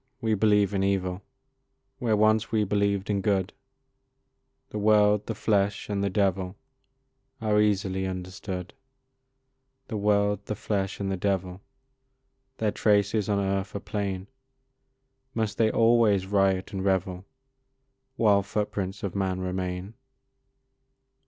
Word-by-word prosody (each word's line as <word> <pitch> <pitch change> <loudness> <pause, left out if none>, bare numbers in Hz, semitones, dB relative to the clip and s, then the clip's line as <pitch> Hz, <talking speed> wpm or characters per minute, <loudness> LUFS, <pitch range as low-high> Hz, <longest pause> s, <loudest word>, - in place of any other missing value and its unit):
we 110 -1 0
believe 105 -1 +3
in 95 - 0
evil, 95 -1 0 0.8
Where 115 -5 +1
once 110 +1 +3
we 110 -2 +2
believed 100 -1 0
in 100 -1 0
good, 95 -2 0 1.2
The 105 - -3
world, 105 0 +4
the 115 - -3
flesh, 100 -1 0
and 100 -1 -1
the 100 - +1
devil 95 -1 0 0.8
Are 105 -1 +2
easily 95 -2 0
understood; 95 0 -6 1.2
The 110 - -3
world, 100 -1 +1
the 105 - -2
flesh, 100 -1 -2
and 100 -1 -2
the 95 - -1
devil 95 -1 -2 1.0
Their 110 -2 0
traces 105 0 +2
on 100 - +2
earth 95 0 -1
are - - -1
plain; 100 -2 -3 1.1
Must 110 -2 -2
they 110 -1 +4
always 115 -4 +3
riot 95 -1 +1
and 95 -1 -3
revel 95 -1 0 0.9
While 105 -5 +4
footprints 100 -1 -3
of 100 - -3
man 95 -2 -1
remain? 90 +1 -3
100 Hz, 125 wpm, -27 LUFS, 95-105 Hz, 1.2 s, world